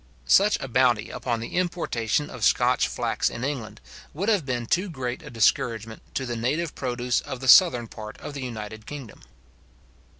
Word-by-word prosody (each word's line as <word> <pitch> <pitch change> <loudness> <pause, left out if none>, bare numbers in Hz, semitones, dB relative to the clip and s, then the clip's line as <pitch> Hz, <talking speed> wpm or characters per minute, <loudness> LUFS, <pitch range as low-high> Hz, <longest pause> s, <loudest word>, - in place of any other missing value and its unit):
Such 205 - +5
a 135 - -5
bounty 120 -3 +2
upon 120 -3 -2
the 115 - -6
importation 150 -8 -1
of - - -7
Scotch - - +3
flax - - -1
in 115 - -6
England 135 -6 -4 0.4
would 195 +8 -1
have 195 -10 +1
been 120 -2 -2
too 185 - 0
great 130 -2 -4
a 150 - -10
discouragement 115 -2 0
to 135 - -1
the 120 -1 -3
native 145 +8 -1
produce 125 -1 -1
of 130 - -6
the 130 - -5
southern 125 -6 +7
part 110 -1 -9
of 150 - -8
the 140 - -6
united 110 -3 -7
kingdom. 140 -7 -9
125 Hz, 175 wpm, -25 LUFS, 115-150 Hz, 0.4 s, southern